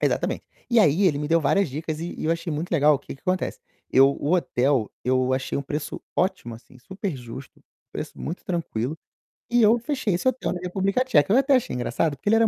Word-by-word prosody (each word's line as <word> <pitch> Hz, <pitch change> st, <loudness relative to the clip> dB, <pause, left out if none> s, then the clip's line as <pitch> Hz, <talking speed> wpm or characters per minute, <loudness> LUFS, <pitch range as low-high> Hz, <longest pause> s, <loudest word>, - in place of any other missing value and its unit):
Exatamente. -, -, 0 dB, 0.2 s
E 235 Hz, -2 st, +4 dB
aí 165 Hz, 0 st, +4 dB
ele 145 Hz, -5 st, +2 dB
me 150 Hz, 0 st, -3 dB
deu 165 Hz, 0 st, +4 dB
várias 180 Hz, +5 st, +2 dB
dicas 155 Hz, +3 st, -4 dB
e 170 Hz, +1 st, -5 dB
e -, -, -4 dB
eu 160 Hz, -, +1 dB
achei 170 Hz, 0 st, -3 dB
muito 155 Hz, +4 st, -3 dB
legal, 150 Hz, -2 st, +5 dB
o 135 Hz, -, -1 dB
que 145 Hz, -, -9 dB
que 135 Hz, -, -19 dB
acontece? 185 Hz, 0 st, -2 dB, 0.3 s
Eu 135 Hz, +1 st, +6 dB
o 145 Hz, +3 st, -2 dB
hotel, 135 Hz, -8 st, +1 dB
eu 130 Hz, 0 st, +2 dB
achei 130 Hz, 0 st, -1 dB
um 140 Hz, -, -2 dB
preço 145 Hz, +2 st, -4 dB, 0.2 s
ótimo, 180 Hz, -, -1 dB
assim, 125 Hz, +2 st, -16 dB
superjusto, 135 Hz, -, -7 dB, 0.3 s
preço -, -, -6 dB
muito 170 Hz, -, -5 dB
tranquilo, 160 Hz, -5 st, -3 dB, 0.5 s
e 240 Hz, 0 st, +3 dB
eu 220 Hz, +2 st, +6 dB
fechei 260 Hz, -5 st, -1 dB
esse 175 Hz, +9 st, -1 dB
hotel 255 Hz, -6 st, 0 dB
na 180 Hz, -, -5 dB
República 195 Hz, +6 st, 0 dB
Tcheca, 155 Hz, -, +3 dB
eu 245 Hz, -, +6 dB
até 275 Hz, 0 st, +4 dB
achei 250 Hz, -, 0 dB
engraçado, 145 Hz, +4 st, 0 dB
porque 170 Hz, +10 st, -3 dB
ele 225 Hz, -, +5 dB
era 225 Hz, -, +5 dB
165 Hz, 220 wpm, -24 LUFS, 140-195 Hz, 0.5 s, Eu